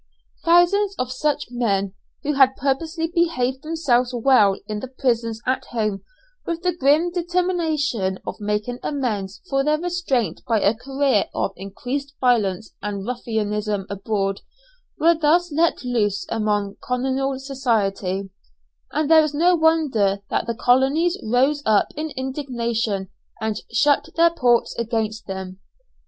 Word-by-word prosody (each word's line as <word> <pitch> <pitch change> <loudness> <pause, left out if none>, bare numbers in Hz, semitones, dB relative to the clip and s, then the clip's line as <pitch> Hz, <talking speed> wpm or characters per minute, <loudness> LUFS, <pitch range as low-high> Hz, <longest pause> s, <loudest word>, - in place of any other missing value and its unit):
Thousands 365 +4 +4
of 255 0 -2
such 290 +1 -1
men, 200 -6 0 0.3
who 295 - 0
had 265 -1 +5
purposely 320 +5 -1
behaved 265 -7 +1
themselves 270 -6 +1
well 225 -6 +4
in 210 -1 -4
the 260 - -6
prison 240 -3 -1
at 255 +1 0
home, 215 -4 -2 0.4
with 335 0 -4
the 360 -2 +1
grim 310 +3 +3
determination 330 - 0
of - - -6
making 210 +4 -2
amends 205 -9 -3
for 275 0 +1
their 300 +1 +2
restraint 315 - -1
by 225 -2 +2
a 200 +1 +3
career 270 -2 +1
of - - 0
increased 250 +9 -5
violence 220 -5 +1
and 200 -2 -4
ruffianism 210 -4 -2
abroad, 195 -1 -2 0.6
were 335 +2 +5
thus 330 +2 +2
let 325 +1 +1
loose 210 -5 0
upon 210 -2 -1
colonial 265 +2 -1
society, 210 -8 -1 0.6
and 305 0 0
there 320 0 +7
is 300 -1 -2
no 350 +4 +4
wonder 290 - +2
that - - 0
the 235 - -2
colonies 270 +9 +3
rose 265 +6 +2
up 215 -4 +3
in 310 +1 -3
indignation 235 -7 -2 0.3
and 220 -1 -2
shut 285 +5 +2
their 335 0 +5
ports 245 -7 +2
against 220 -1 -2
them. 190 -1 -6
250 Hz, 135 wpm, -22 LUFS, 210-300 Hz, 0.6 s, there